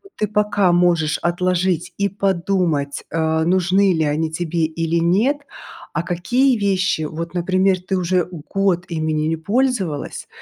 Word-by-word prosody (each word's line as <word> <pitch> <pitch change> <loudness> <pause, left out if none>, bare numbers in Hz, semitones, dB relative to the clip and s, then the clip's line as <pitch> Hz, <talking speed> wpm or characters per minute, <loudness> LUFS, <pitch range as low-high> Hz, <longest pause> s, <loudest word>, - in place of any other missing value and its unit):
ты 210 - -1
пока 205 -2 +2
можешь 175 -3 +2
отложить 180 0 0
и 200 - +1
подумать, 180 -7 -1
э, 160 0 0
нужны 185 +2 +3
ли 160 -2 +1
они 155 +2 -1
тебе 165 0 -1
или 165 +1 -1
нет, 195 - +2 0.6
а 170 - -1
какие 240 +10 +1
вещи, 190 -5 +1
вот, 165 +3 -5
например, 185 +1 +1
ты 190 +1 -2
уже 180 -1 +1 0.3
год 195 -3 +1
ими 160 -2 -2
не 155 0 0
не 165 - 0
пользовалась 200 - -1
175 Hz, 145 wpm, -20 LUFS, 160-195 Hz, 0.6 s, нужны